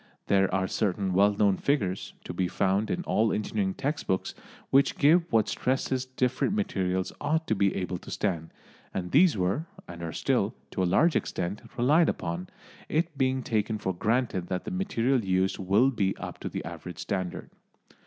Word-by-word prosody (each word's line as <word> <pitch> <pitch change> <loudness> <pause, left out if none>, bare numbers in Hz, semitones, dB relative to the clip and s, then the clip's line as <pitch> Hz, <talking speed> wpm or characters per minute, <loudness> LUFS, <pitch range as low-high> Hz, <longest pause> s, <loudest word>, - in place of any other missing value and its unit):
There 95 -1 +3
are 95 0 +1
certain 95 -2 -1
well 100 +2 +5
known 100 -2 +3
figures, 100 -10 -1
to - - -6
be 90 +1 0
found 100 +4 +1
in 180 - -1
all 110 -9 +2
engineering 105 -2 -1
text 145 +2 -3
books, 95 - -1 0.4
which 140 +1 +4
give 165 +4 +4
what 110 -2 +3
stresses 130 0 -1
different 130 +7 0
materials 95 - -1
ought 160 +2 0
to - - +1
be 100 -2 +2
able 90 -1 -3
to - - -12
stand, 85 -6 -2 0.5
and 90 -1 -3
these 175 - +5
were, 95 - 0 0.2
and 85 -1 -9
are 85 -1 -4
still, - - 0 0.2
to - - -2
a - - +3
large 160 - +4
extent, 90 +4 -2 0.2
relied 150 +7 +4
upon, 85 +2 -3 0.4
it 160 0 0
being 130 -1 +1
taken 110 -1 0
for 95 -2 -2
granted 110 -2 0
that 90 -1 -3
the - - -4
material 135 - +1
used 95 0 +1
will 100 +8 +3
be 100 -6 0
up - - -7
to - - -4
the - - -5
average 85 0 -7
standard. 95 +1 -4
105 Hz, 180 wpm, -28 LUFS, 95-130 Hz, 0.5 s, well